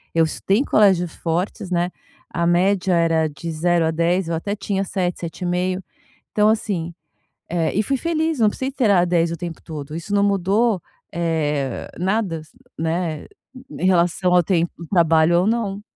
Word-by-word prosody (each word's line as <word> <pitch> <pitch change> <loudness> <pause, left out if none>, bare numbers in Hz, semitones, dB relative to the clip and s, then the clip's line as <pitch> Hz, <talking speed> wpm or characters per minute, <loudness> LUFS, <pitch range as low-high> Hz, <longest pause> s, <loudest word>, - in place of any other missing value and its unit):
Eu 165 - +5
estudei 195 - 0
colégio 195 -9 +4
fortes, 175 +5 -3
né, 175 0 0 0.4
a 170 -1 0
média 185 +2 +2
era 165 -1 +2
de 165 +3 -6
0 170 +1 +1
à 160 - +1
10, 170 +2 +1
eu 170 - -2
até 200 +5 -3
tinha 195 -1 -2
7, 180 -2 -2
7,5. 180 +2 -2 0.5
Então 210 0 +3
assim, 195 -6 -1 0.6
eh 165 -2 0
e 210 - +2
fui 270 +6 0
feliz, 320 0 -1
não 220 -2 +5
precisei 260 +5 -3
de - - -30
ter 245 -6 +2
a 180 -3 +5
10 170 -1 +1
o - - -2
tempo 170 -2 -6
todo, 150 -2 -7
isso 170 +5 -5
não 200 0 +3
mudou, 200 +1 +2 0.3
eh, 150 -6 -1
nada 190 -1 0
s 155 - -18 0.3
né, 160 0 -2
e 265 - -13
em - - +3
relação 180 0 +2
ao 180 -1 +5
tempo, 170 -1 +1 0.2
trabalho 165 -1 +4
ou 185 - +1
não. 210 -3 -1
180 Hz, 175 wpm, -21 LUFS, 165-200 Hz, 0.6 s, Eu